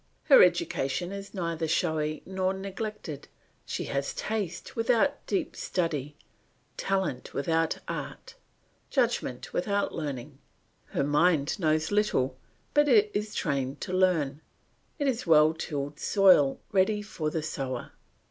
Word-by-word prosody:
Her - - +8
education 175 - +1
is 200 0 -7
neither 170 -3 -2
showy 155 -1 0
nor 190 0 -1
neglected; 195 -5 -6 0.4
she - - -3
has 140 0 -2
taste 205 -5 -4
without 245 +5 +2
deep 200 - -1
study, 150 -5 -2 0.6
talent 190 -10 -2
without 165 +2 +1
art, - - -6 0.6
judgment 240 - -1
without 200 +2 0
learning. 140 -3 -5 0.5
Her - - -1
mind 150 +3 +2
knows 155 -1 +1
little, 205 -11 +1 0.4
but 295 0 +4
it 210 -5 +5
is 210 +1 -3
trained 135 -1 -1
to 185 - -4
learn; 165 -6 +2 0.6
it 285 -3 0
is 245 -6 -1
well 155 -1 +6
tilled 145 -3 -4
soil 185 -9 +5
ready 205 +2 +2
for 170 -7 -3
the 155 0 -3
sower. 135 -4 -4
170 Hz, 125 wpm, -28 LUFS, 150-205 Hz, 0.6 s, Her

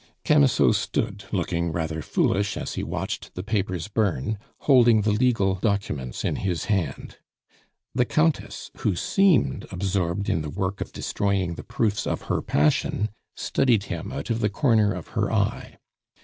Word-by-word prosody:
Camusot 145 -7 +5
stood, 100 +1 -2
looking 85 -3 -1
rather 80 -1 -2
foolish 100 +6 0
as - - -4
he - - -3
watched - - -4
the 90 - -4
papers 95 -4 -2
burn, 105 - -1 0.2
holding 120 -6 +5
the 105 - +2
legal 105 -3 +2
documents 85 - -2
in - - 0
his 90 -4 -2
hand. 95 - -2 0.8
The 125 0 +2
Countess, 155 +3 0
who 100 - 0
seemed 170 - +2
absorbed 95 0 -1
in 80 - +1
the 75 - -4
work 95 +4 -3
of - - -4
destroying 100 -3 -1
the - - -8
proofs 105 -3 -1
of - - -2
her - - 0
passion, 75 +8 +1 0.3
studied 115 -6 +2
him 85 +6 -5
out 135 -2 -4
of 115 - 0
the 105 - +1
corner 110 -2 +3
of 90 -4 -6
her - - -1
eye. - - -1
100 Hz, 155 wpm, -25 LUFS, 90-110 Hz, 0.8 s, Camusot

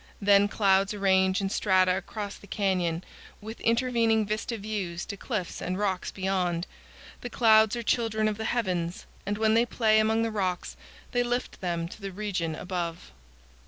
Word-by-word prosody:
Then 200 0 +5
clouds 195 -1 +2
arrange 190 -1 +2
in 195 -1 -2
strata 185 -3 +3
across 200 +2 -5
the 200 - -15
canyon, 185 -4 0 0.4
with 220 +2 -9
intervening 230 -2 +2
vista 215 +3 -3
views 195 -5 -4
to 200 - -6
cliffs 205 -4 -4
and 185 +1 -2
rocks 195 -3 -1
beyond. 185 -3 -1 0.6
The 245 - -5
clouds 220 -2 +5
are 235 - -4
children 220 -2 +1
of 215 0 -2
the 220 - -3
heavens, 180 -8 -1 0.2
and 205 0 -1
when 220 0 +3
they 230 +1 +5
play 220 -2 +2
among 220 +1 +2
the 225 - -1
rocks 185 -4 -2 0.4
they 245 - +2
lift 245 +1 -2
them 170 -2 -2
to 200 - -12
the 195 0 -5
region 185 -5 -3
above. 175 -1 -5
200 Hz, 165 wpm, -27 LUFS, 185-220 Hz, 0.6 s, Then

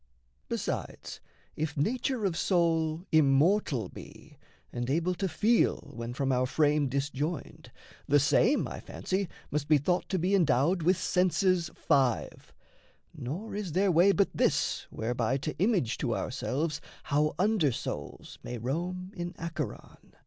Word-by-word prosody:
Besides, - - -4 0.4
if 150 -1 -3
nature 235 - 0
of 185 -4 0
soul 165 -2 +1
immortal 150 - +3
be, - - -13 0.4
And 120 +1 -3
able 170 +5 +1
to 195 +2 -2
feel, 215 +9 +1
when 115 +1 -6
from 135 -1 0
our 130 0 +2
frame 150 +1 +2
disjoined, 145 +4 -3 0.4
The 145 +1 +5
same, 160 - +3
I - - -7
fancy, 190 -1 -3 0.2
must 145 0 -1
be 155 - +5
thought 175 +6 0
to 190 - 0
be 185 +3 0
Endowed 170 0 +3
with 180 +3 +3
senses 185 -2 +2
five, 135 -6 0 0.6
nor 165 - -5
is 200 -6 -4
there 190 +2 +3
way 175 +4 +5
But 200 0 +2
this - - 0
whereby 120 +3 -1
to 155 +3 -4
image 185 - +1
to 120 -5 0
ourselves 150 +4 -2 0.2
How 150 +1 +1
under 190 -6 +2
souls - - -6
may 125 - -6
roam 175 - -3
in 175 0 -5
Acheron. 165 0 -6
160 Hz, 140 wpm, -29 LUFS, 140-185 Hz, 0.6 s, The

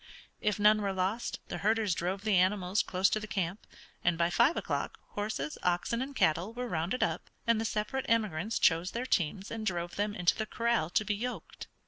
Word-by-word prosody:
If 210 -1 0
none 210 +1 +5
were 200 -1 -1
lost 190 +5 -2
the - - -4
herders 215 -2 +2
drove 185 +4 -2
the 215 -2 +2
animals 185 +1 +3
close 185 +1 +2
to 215 - +1
the 215 - -7
camp, 190 +1 -3 0.4
and 175 -1 +2
by 170 +1 +2
five 240 - +4
o'clock - - -2
horses, 205 -9 -3
oxen, 180 +7 0
and 275 +1 -5
cattle 170 +6 +1
were 250 0 -3
rounded 175 +5 -1
up, - - -2 0.2
and 230 -1 +3
the - - -2
separate 220 +5 -2
emigrants 215 -3 +1
chose 170 +3 +3
their 240 +2 -2
teams 190 -2 0
and 225 -1 -4
drove 175 -4 -2
them 205 +1 0
into 180 -4 +3
the 220 -1 -3
corral 230 -8 0
to 210 - +1
be 210 - 0
yoked. 245 +5 -5
205 Hz, 200 wpm, -31 LUFS, 180-225 Hz, 0.4 s, none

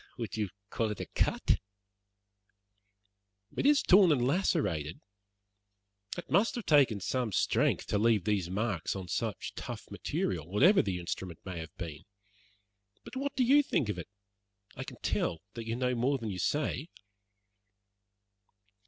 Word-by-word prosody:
"Would 115 -6 -4
you 105 -3 -1 0.2
call 115 -2 0
it 105 - -4
a - - -3
cut?" - - +1 2.0
"It - - -1
is 290 -1 +5
torn 185 -2 +7
and 125 -5 +2
lacerated. 125 - 0 1.2
It - - -6
must 200 +7 +3
have 240 - -4
taken 135 -9 +4
some 120 +3 -1
strength - - +2
to 105 - 0
leave 110 -3 +3
these 100 -5 0
marks 100 -3 -1
on 95 -2 -5
such - - -3
tough - - -7
material, 80 -4 -2
whatever 155 - +5
the 95 -3 -2
instrument 90 0 -5
may 90 -3 -5
have 80 -1 -9
been. 80 -4 -7 1.0
But - - -11
what 280 +2 -2
do 260 - +3
you 275 +4 +6
think 140 - 0
of 105 - -2
it? - - -8 0.7
I - - -5
can - - -9
tell 80 0 -1
that 115 -1 -7
you 115 - -1
know 125 0 0
more 130 +4 +1
than 115 -4 -4
you 90 - -5
say." 150 - -1
115 Hz, 155 wpm, -31 LUFS, 95-150 Hz, 2.0 s, torn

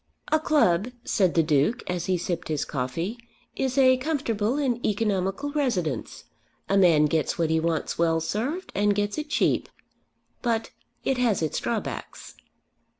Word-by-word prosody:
"A 310 - +4
club," 230 - +3 0.2
said 185 -6 +1
the 165 - +5
Duke, 155 - +1
as 180 -2 -2
he 185 -1 +2
sipped 175 0 -3
his 155 -2 -1
coffee, 160 - -3 0.4
"is 265 0 -1
a 260 -1 +6
comfortable 255 -5 -1
and 250 -5 0
economical 205 +5 0
residence. 190 - -2 0.4
A 195 - +1
man 170 -6 +5
gets 155 +1 0
what 165 -2 +1
he 160 - +3
wants 165 -1 -1
well 165 -1 +3
served, 250 - -3
and 205 +1 +2
gets 205 +5 -1
it 300 0 -5
cheap. - - +1 0.7
But 230 -2 -1 0.3
it 265 -2 0
has 225 -9 +2
its 155 - -1
drawbacks." - - -4
205 Hz, 150 wpm, -26 LUFS, 165-255 Hz, 0.7 s, a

